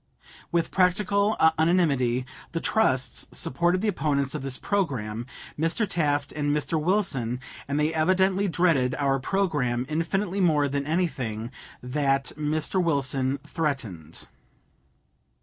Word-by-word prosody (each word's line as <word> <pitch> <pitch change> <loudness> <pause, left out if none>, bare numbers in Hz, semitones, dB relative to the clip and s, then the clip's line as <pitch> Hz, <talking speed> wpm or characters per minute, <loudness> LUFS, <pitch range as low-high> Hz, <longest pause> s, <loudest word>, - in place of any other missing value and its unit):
With 170 -1 0
practical 200 +3 +2 0.2
unanimity 140 -8 +2 0.3
the 165 - -1
trusts 130 -11 0
supported 175 +7 0
the 220 - 0
opponents 140 -8 0
of - - -3
this 135 -1 -2
programme, 120 - -2 0.3
Mr. 165 +7 +1
Taft 145 -5 0
and 145 -1 -2
Mr. 150 +2 0
Wilson, 150 - 0 0.3
and 140 +1 -1
they 155 +2 +1
evidently 190 +4 +2
dreaded 160 -8 +2
our 135 -1 +1
programme 135 -7 0
infinitely 175 +5 -1
more 150 -5 +3
than 140 +1 -2
anything 130 -9 -2 0.3
that 135 +1 0
Mr. 155 +5 0
Wilson 135 -4 0
threatened. 110 - -4
150 Hz, 115 wpm, -26 LUFS, 135-180 Hz, 0.3 s, more